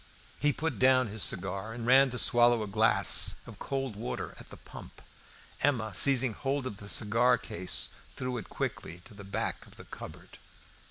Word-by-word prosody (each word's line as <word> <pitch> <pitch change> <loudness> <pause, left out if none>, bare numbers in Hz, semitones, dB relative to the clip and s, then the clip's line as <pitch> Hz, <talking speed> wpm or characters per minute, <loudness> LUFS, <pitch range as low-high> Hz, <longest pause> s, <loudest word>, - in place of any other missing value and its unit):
He 145 - +2
put 145 -5 -4
down 130 -2 +3
his 110 +1 -4
cigar 95 +4 0
and 115 0 -6
ran 135 +2 +5
to 125 - -4
swallow 120 -2 +3
a - - -6
glass 100 - +3
of - - -12
cold 135 -5 -4
water 110 +4 -5
at - - -12
the - - -11
pump. - - -13 0.6
Emma 115 -7 0
seizing 130 +1 +4
hold 135 +3 -3
of 105 -6 -6
the 100 0 -8
cigar 115 +8 +3
case 90 +2 0 0.3
threw 125 -1 -4
it 105 - -11
quickly 85 +2 -5
to 120 - -13
the 100 0 -11
back 100 - -4
of - - -17
the - - -12
cupboard. - - -11
120 Hz, 180 wpm, -29 LUFS, 100-130 Hz, 0.6 s, ran